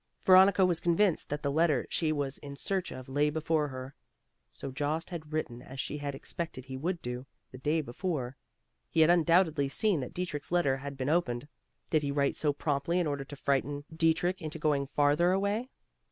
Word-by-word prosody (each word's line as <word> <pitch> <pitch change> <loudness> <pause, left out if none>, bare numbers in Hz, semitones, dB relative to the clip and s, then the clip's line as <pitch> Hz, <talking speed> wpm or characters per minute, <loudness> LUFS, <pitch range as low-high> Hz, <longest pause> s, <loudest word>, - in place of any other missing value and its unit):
Veronica 190 0 +7
was 175 -2 +1
convinced 175 +1 +2
that 145 0 -3
the 140 - +1
letter 155 -3 +2
she 160 -2 0
was 140 -2 -2
in 140 -1 -8
search 185 +5 -2
of 130 -1 -8
lay 145 +3 +2
before 155 0 0
her. 130 0 -7 0.6
So 135 - -7
Jost 150 +6 -2
had 155 -3 -7
written 130 -6 -3
as 130 +1 -10
she 150 +3 -3
had 145 -1 -4
expected 135 -2 -5
he 130 0 -7
would 170 +6 -3
do, 125 +2 -5 0.2
the 130 - -10
day 155 +4 +1
before. 135 -1 -3 0.5
He 160 - +2
had 160 +2 +7
undoubtedly 165 -4 +3
seen 200 +3 +1
that 125 - -6
Dietrich's 170 -5 -4
letter 145 -7 +2
had 140 0 -7
been 130 0 -2
opened. 145 -6 0 0.4
Did 155 - +3
he 145 - -2
write 140 0 +1
so 150 - +1
promptly 145 +3 -1
in 175 - +1
order 145 -2 -2
to 145 +1 -9
frighten 140 +1 0
Dietrich 165 +3 +2
into 155 0 -4
going 145 -3 +1
farther 145 +5 +3
away? 200 +6 0
150 Hz, 195 wpm, -30 LUFS, 140-170 Hz, 0.6 s, Veronica